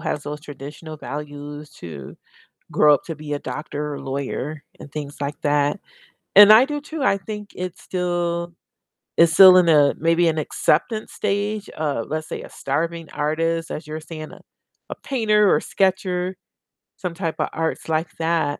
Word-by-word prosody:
has 155 -3 -2
those 150 +1 -6
traditional 150 +2 -9
values 145 0 -7
to 70 -6 -9 0.5
grow 150 -1 +6
up - - -3
to 165 -3 -6
be 150 -1 -7
a 145 - -1
doctor 150 -1 -5
or - - -7
lawyer 140 +2 -4 0.2
and 145 - -12
things 145 -1 -6
like 145 +1 -4
that, 145 +4 +1 0.6
and 205 +1 +10
I 225 +4 +8
do 295 0 -4
too, 310 0 -6
I 195 - +3
think 210 0 -7
it's 180 -1 -6
still 175 -1 -2 0.6
it's 165 -1 +5
still 185 +1 +9
in 180 -2 +5
a 145 -3 +5
maybe 165 +1 +3
an 160 -1 0
acceptance 215 +8 0
stage 205 +1 -2
of, 145 -7 -2
let's 155 +1 -3
say, - - -5
a - - -11
starving 165 +4 -3
artist, 165 +3 -1
as 155 - -5
you 155 - -8
were 155 - -4
saying, 155 0 -8
uh, - - -12 0.5
a - - -3
painter 215 -6 +2
or - - +2
sketcher, 185 -1 0 0.6
some 180 -3 -4
type 165 -2 -3
of - - +1
arts 165 0 -2
like 160 +1 0
that. 160 -3 0
160 Hz, 175 wpm, -22 LUFS, 150-185 Hz, 0.6 s, and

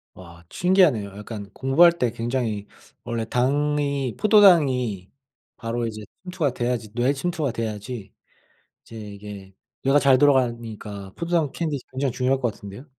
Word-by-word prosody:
와 85 -2 -14
신기하네요. 180 - +3
약간 105 -1 -8
공부할 155 +7 +5
때 125 -9 -1
굉장히 115 -3 -3 0.4
원래 115 -1 -3
당이 140 +1 0
포도당이 140 - +4 0.5
바로 115 0 -3
이제 110 -1 -7 0.2
침투가 180 -7 -2
돼야지 120 -3 -2
뇌에 125 +4 +1
침투가 155 -1 -2
돼야지 110 -1 -5 0.7
이제 115 - -13
이게 100 -2 -9 0.3
뇌가 135 +2 +4
잘 135 -3 +4
돌아가니까 115 -8 0
포도당 170 -4 0
캔디 155 -3 -3
굉장히 130 0 -1
중요할 130 +2 0
것 120 -4 -1
같은데요. 100 +5 -11
125 Hz, 320 characters per minute, -23 LUFS, 110-145 Hz, 0.7 s, 공부할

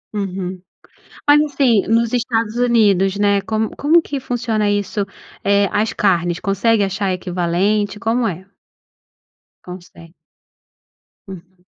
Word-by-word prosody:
Uhum. 185 -2 -4 0.7
Mas, 290 +1 +6
assim, 270 -8 +1
nos 230 +1 +2
Estados 230 -2 -1
Unidos, 205 -6 +2
né, 200 -1 +2
como 220 +2 -2
como 325 +4 +3
que 280 -3 -5
funciona 225 -4 -1
isso? 205 0 -2 0.4
Eh, 200 0 +3
as 210 +2 0
carnes, 175 -4 +1
consegue 205 +2 +1
achar 195 0 -2
equivalente? 185 +3 -1
Como 230 +1 0
é? 185 0 -6 1.2
Consegue. 175 -2 -12 1.2
Uhum. 185 -1 -13
205 Hz, 110 wpm, -18 LUFS, 190-230 Hz, 1.2 s, Mas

